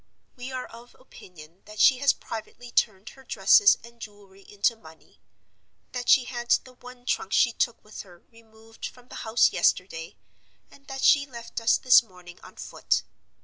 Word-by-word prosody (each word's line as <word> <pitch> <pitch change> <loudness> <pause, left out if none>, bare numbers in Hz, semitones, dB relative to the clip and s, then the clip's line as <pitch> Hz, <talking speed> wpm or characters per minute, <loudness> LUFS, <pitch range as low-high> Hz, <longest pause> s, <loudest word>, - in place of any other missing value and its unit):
We 250 0 -8
are 255 -1 -5
of 235 +2 -15
opinion 175 -8 -16
that 210 0 -12
she 260 -2 +5
has 280 0 +4
privately 235 +2 -9
turned 205 -4 0
her 265 - -17
dresses 410 +8 +4
and 235 0 -16
jewelry 200 -2 -13
into 205 +3 +1
money; 160 -7 -19 0.7
that 245 -1 -5
she 265 - +6
had 240 -1 -7
the 255 - -16
one 250 0 -15
trunk 195 - -2
she 240 - +4
took 235 0 -2
with 215 - -10
her 175 -3 -18
removed 225 0 -12
from 250 0 -17
the - - -9
house 225 +1 +3
yesterday; 165 -3 -1 0.5
and 280 0 -20
that 270 -1 -6
she 280 -1 +4
left 235 -2 -8
us 230 - +3
this 255 -1 +6
morning 180 -5 -16
on - - -15
foot. - - -2
230 Hz, 175 wpm, -25 LUFS, 205-250 Hz, 0.7 s, she